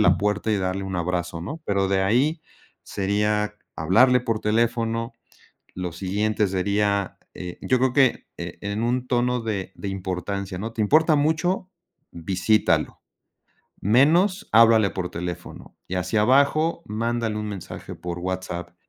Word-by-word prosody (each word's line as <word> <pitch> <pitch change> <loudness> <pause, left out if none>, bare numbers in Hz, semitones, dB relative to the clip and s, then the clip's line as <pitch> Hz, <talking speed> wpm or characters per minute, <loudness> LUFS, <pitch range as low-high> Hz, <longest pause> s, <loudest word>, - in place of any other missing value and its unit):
la 105 - +4
puerta 105 +1 0
y 105 - +2
darle 95 0 -2
un 95 -1 -4
abrazo, 85 -1 -2
¿no? 150 - -6
Pero 100 -1 +1
de 95 0 +1
ahí 140 - +1 0.4
sería 105 +2 0 0.2
hablarle 125 +11 +4
por 115 -3 -2
teléfono, 115 +1 0 0.6
lo 90 -2 -4
siguiente 105 +4 0
sería, 100 +1 0 0.2
eh, 90 -1 -8
yo 130 - +2
creo 130 0 +1
que 135 -4 +3
en 100 +5 -5
un 125 +1 0
tono 125 0 +1
de 100 -4 -4
de 100 - -6
importancia, 95 0 -4
¿no? 110 +4 -5
¿Te 110 - 0
importa 155 +7 +4
mucho? 160 +5 0 0.4
Visítalo, 95 +5 +1 0.8
menos 170 - +3
háblale 110 -2 +6
por 90 -2 -4
teléfono 90 0 -7
y 95 - -3
hacia 90 +4 0
abajo 140 +8 +3
mándale 115 0 -2
un 105 0 -3
mensaje 100 -4 -7
por 90 -1 -6
WHATSAPP. 90 -1 -4
105 Hz, 140 wpm, -24 LUFS, 95-120 Hz, 0.8 s, háblale